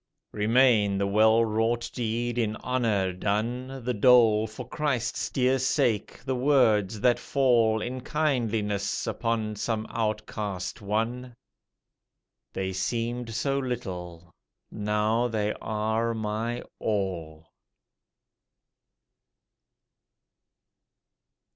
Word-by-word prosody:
Remain 110 -2 +3
the 100 - +1
well 110 +3 +4
wrought 115 +2 0
deed 120 0 -2
in 110 -2 0
honour 110 -7 0
done, 120 +7 -2
The 125 - 0
dole 110 -1 +5
for 110 - -9
Christ's 145 -6 -1
dear 130 0 +2
sake, 115 -3 0
the 130 - 0
words 120 -6 +3
that 120 +1 +3
fall 115 -5 +2
In 125 +1 -4
kindliness 115 -10 -1
upon 110 -1 -2
some 110 0 -2
outcast 105 -4 -3
one, 115 +4 -2 1.2
They 95 0 -3
seemed 115 +4 -2
so 140 +2 0
little: 90 -10 -5 0.4
now 105 +3 0
they 105 -2 -1
are 110 +2 -1
my 110 +2 -3 0.2
All. 85 -7 -3
110 Hz, 90 wpm, -27 LUFS, 105-120 Hz, 1.2 s, dole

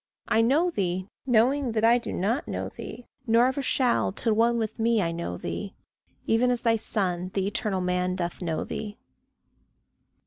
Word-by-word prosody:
I 225 -1 +3
know 300 +10 +3
thee, 185 - -2 0.2
knowing 250 +2 +3
that 220 -1 0
I 235 +2 +5
do - - -6
not 225 +10 -1
know - - -3
thee, 245 - -9 0.2
Nor 230 +2 +5
ever 260 +2 0
shall 255 -5 +1
till 220 +3 0
one 230 +2 +3
with 220 0 -3
me 230 0 +3
I 170 -4 0
know 165 - -4
thee - - -5 0.5
Even 235 +3 +3
as 245 -1 +1
thy 230 -1 +3
son, 185 -5 -1
the 195 -1 +1
eternal 200 -1 -1
man, 180 0 0
doth 175 -1 -4
know 165 -3 -2
thee. 210 0 -6
225 Hz, 175 wpm, -26 LUFS, 185-240 Hz, 0.5 s, I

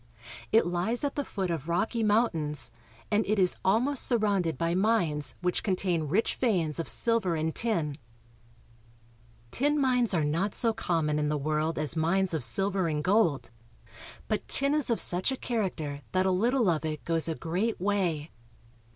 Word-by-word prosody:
It 225 - +4
lies 180 +9 -1
at 285 -1 -1
the 285 - -2
foot 190 -8 -3
of 160 -1 -4
rocky 225 +7 0
mountains, 170 - +1 0.4
and 210 +1 +3
it 215 +1 +1
is 185 -2 +3
almost 245 +8 +2
sur 240 - +2
rounded 195 -7 0
by 165 0 0
mines 175 - 0
which 180 0 0
contain 180 -5 0
rich 195 +10 +1
veins 175 - 0
of 165 - -2
silver 230 -7 +2
and 160 0 -1
tin. 230 -2 0
MINERAL 160 -5 -1 1.6
WEALTH. - - -5
99 290 +1 +3
Tin - - 0
mines 250 -5 +2
are 160 - +1
not 170 +7 -1
so 230 -2 +2
common 155 -7 -1
in 150 - 0
the 150 0 0
world 155 +2 -1
as 155 +1 0
mines 180 +3 +1
of 155 -5 -1
silver 190 - +2
and 150 -2 -2
gold, 185 - +1 0.8
but 215 - -2
tin 280 +1 0
is 300 -4 0
of 230 - +1
such 180 +8 +2
a 265 - -3
character 175 - -3
that 185 0 +2
a 190 - +2
little 235 +5 +2
of 165 -3 +1
it 155 -1 -4
goes 165 -1 +1
a 160 - -2
great 180 +9 -2
way. 175 -6 -1
185 Hz, 185 wpm, -28 LUFS, 160-220 Hz, 1.6 s, It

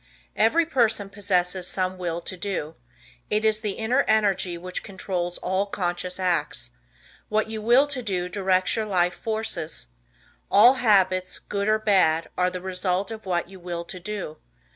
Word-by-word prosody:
Every 315 +11 +3
person 225 -9 +1
possesses 185 -2 0
some 185 -1 -2
"Will 170 -1 -2
To 185 - -5
Do." 180 -5 -3 0.6
It 210 +1 +1
is 215 -1 +3
the 210 -3 -2
inner 235 +6 +1
energy 195 -5 +2
which 180 +1 -5
controls 180 -2 -3
all 190 +2 -1
conscious 180 -1 -3
acts. 175 - -1 0.6
What 215 +1 0
you 220 -1 -4
will 240 +6 +5
to 275 -3 -3
do 185 -6 -2
directs 185 -1 +1
your 220 -1 -1
life 180 -3 +2
forces. 220 - -2 0.6
All 235 +6 +7
habits, 185 -5 +3
good 200 0 -3
or 215 0 +4
bad, 185 -7 +2
are 180 0 +2
the 180 0 -6
result 185 +1 -1
of 220 -3 -8
what 175 -2 0
you 190 0 -13
will 170 -1 -5
to 185 - -8
do. 180 -4 -5
190 Hz, 165 wpm, -25 LUFS, 180-215 Hz, 0.6 s, All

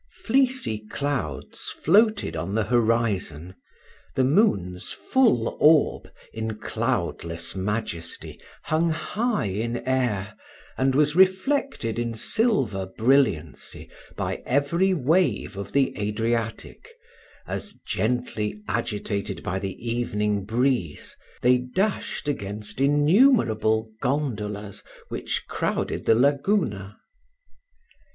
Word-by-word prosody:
Fleecy 255 - +1
clouds 120 - -3
floated 215 - +2
on 85 +5 -3
the 110 - +2
horizon 110 -8 0 0.6
the 130 - +3
moon's 100 - +1
full 225 - +2
orb, 155 0 +4 0.2
in 110 -1 -3
cloudless 85 -5 -3
majesty, 95 -3 -4 0.2
hung 160 +2 +1
high 210 - -1
in 110 +5 -2
air, 110 -6 0 0.4
and 130 0 +1
was 150 +1 +3
reflected 190 - +2
in 120 -1 -2
silver 120 - +1
brilliancy 110 - 0 0.2
by - - -3
every 145 +8 +2
wave 155 - +1
of 100 0 -6
the 140 -1 +2
Adriatic, 115 - -2 0.6
as, 205 - -5
gently 110 -1 -1
agitated 105 -2 -3
by 95 +2 -2
the 95 -1 -4
evening 105 -4 -1
breeze, 120 - -1 0.3
they 125 0 +5
dashed 185 +6 -2
against 105 -3 -4
innumerable 140 - +3
gondolas 105 -7 -2 0.3
which - - -3
crowded - - -2
the 115 - +6
Laguna. 135 - +1
120 Hz, 95 wpm, -25 LUFS, 105-150 Hz, 0.6 s, the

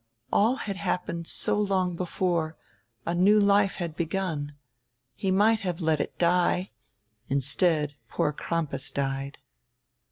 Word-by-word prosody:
All 225 +5 +4
had 205 -8 -5
happened 170 -1 -3
so - - +3
long 190 -3 0
before, 170 -2 -1 0.5
a 170 - -1
new 195 +5 +5
life 200 -1 +3
had 170 -3 -4
begun 165 -4 -3 0.3
— 125 +1 -53
he 195 - -3
might 210 +4 +4
have 180 -3 -3
let 160 -3 +1
it - - -5
die; 180 +2 +2 0.6
instead 145 +3 +2 0.2
poor 150 - 0
Crampas 145 -4 -2
died. 135 0 -3
175 Hz, 130 wpm, -27 LUFS, 150-190 Hz, 0.6 s, new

